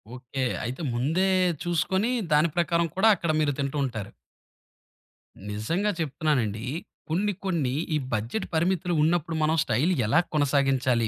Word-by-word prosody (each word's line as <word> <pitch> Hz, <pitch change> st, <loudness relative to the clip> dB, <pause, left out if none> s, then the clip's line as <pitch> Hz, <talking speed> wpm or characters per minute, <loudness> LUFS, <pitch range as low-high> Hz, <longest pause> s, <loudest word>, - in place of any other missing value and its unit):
Okay. 130 Hz, +1 st, -4 dB, 0.2 s
అయితే 125 Hz, +8 st, -4 dB
ముందే 155 Hz, +11 st, +1 dB, 0.4 s
చూసుకొని 190 Hz, +6 st, 0 dB, 0.2 s
దాని 155 Hz, +3 st, +4 dB
ప్రకారం 170 Hz, 0 st, +2 dB
కూడా 205 Hz, +4 st, +4 dB
అక్కడ 170 Hz, -4 st, -1 dB
మీరు 150 Hz, -2 st, +2 dB
తింటూ 140 Hz, +1 st, -2 dB
ఉంటారు. 110 Hz, -6 st, -5 dB, 1.4 s
నిజంగా 165 Hz, -, -1 dB
చెప్తున్నానండి 135 Hz, -8 st, -1 dB, 0.5 s
కొన్ని 200 Hz, +5 st, 0 dB
కొన్ని 155 Hz, -9 st, 0 dB, 0.2 s
ఈ -, -, +3 dB, 0.2 s
బడ్జెట్ 115 Hz, -, -2 dB
పరిమితులు 175 Hz, +1 st, +1 dB
ఉన్నప్పుడు 165 Hz, 0 st, +1 dB
మనం 160 Hz, +1 st, +2 dB
స్టైల్ 135 Hz, +9 st, +1 dB
ఎలా 130 Hz, +10 st, +4 dB
కొనసాగించాలి, 135 Hz, -5 st, +2 dB
155 Hz, 125 wpm, -26 LUFS, 130-175 Hz, 1.4 s, దాని